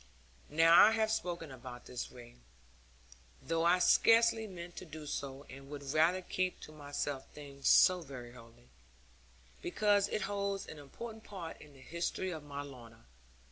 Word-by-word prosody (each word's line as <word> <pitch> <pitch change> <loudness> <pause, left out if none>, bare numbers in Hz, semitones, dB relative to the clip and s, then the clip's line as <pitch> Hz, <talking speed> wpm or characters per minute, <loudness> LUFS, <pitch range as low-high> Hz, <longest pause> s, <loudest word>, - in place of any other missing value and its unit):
Now 165 +3 +7
I 220 - +4
have 220 -1 +1
spoken 170 -7 -3
about 125 -1 -10
this 125 -1 -6
ring 120 - -14 1.0
(though 165 +5 -1
I 175 +1 +5
scarcely 225 +4 +5
meant 175 -2 -9
to - - -6
do 155 -1 -9
so, 140 -1 -5
and 135 +1 -11
would 140 -1 -6
rather 170 +4 +3
keep 185 0 -2
to - - -10
myself 145 -2 -4
things 140 -2 -6
so 185 -1 +6
very 130 -6 -9
holy) 120 0 -16 0.9
because 205 +1 +2
it - - -2
holds 200 -1 -2
an 155 - -10
important 220 +10 -9
part 180 -7 -8
in 150 -1 -14
the 135 - -16
history 170 +5 -3
of 160 -3 -5
my 145 -1 -6
Lorna. 120 - -13
155 Hz, 160 wpm, -34 LUFS, 135-185 Hz, 1.0 s, Now